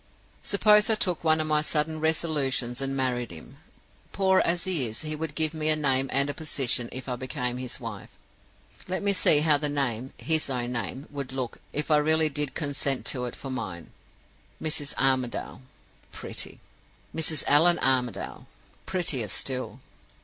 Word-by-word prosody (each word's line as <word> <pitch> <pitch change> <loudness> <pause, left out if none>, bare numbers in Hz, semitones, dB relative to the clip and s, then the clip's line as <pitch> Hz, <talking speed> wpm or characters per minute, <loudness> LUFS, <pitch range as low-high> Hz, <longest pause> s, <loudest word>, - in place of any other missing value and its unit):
"Suppose 210 +1 +4
I 220 - +6
took 180 -6 -1
one 160 -1 +4
of 155 - +1
my 155 -1 +2
sudden 155 +1 -1
resolutions, 145 -6 0
and 135 0 -1
married 125 -3 0
him. 80 -2 -11 0.5
Poor 190 -1 +3
as 170 0 +1
he 170 -10 +3
is, 110 +5 -6
he 155 0 -2
would 150 -1 -5
give 155 -1 +1
me 155 -1 -1
a 155 - +4
name 135 -3 +1
and 140 +1 +2
a 145 - -2
position 135 -5 -1
if 130 +1 -7
I 125 - -1
became 125 -1 -3
his 125 0 -5
wife. 115 -6 -7 0.8
Let 185 +2 -2
me 200 0 +3
see 150 -5 +6
how 150 -2 +4
the 150 0 -1
name 130 -3 -2
his 160 -3 +1
own 125 -2 -2
name 130 +3 -3
would 140 -3 -5
look, 130 -3 -5
if 150 +1 -1
I 150 - +6
really 155 +1 +3
did 145 -2 -2
consent 145 -3 -1
to 125 -2 -3
it 120 - -5
for 135 - -7
mine. 85 -10 -5 0.7
"'Mrs. 150 -2 -3
Armadale!' 130 -2 0 0.5
Pretty. - - -5 0.6
"'Mrs. 160 -2 -1
Allan 170 +4 +6
Armadale!' 125 -6 -1 0.4
Prettier 155 - +1
still. 130 +4 -3
145 Hz, 170 wpm, -27 LUFS, 130-155 Hz, 0.8 s, I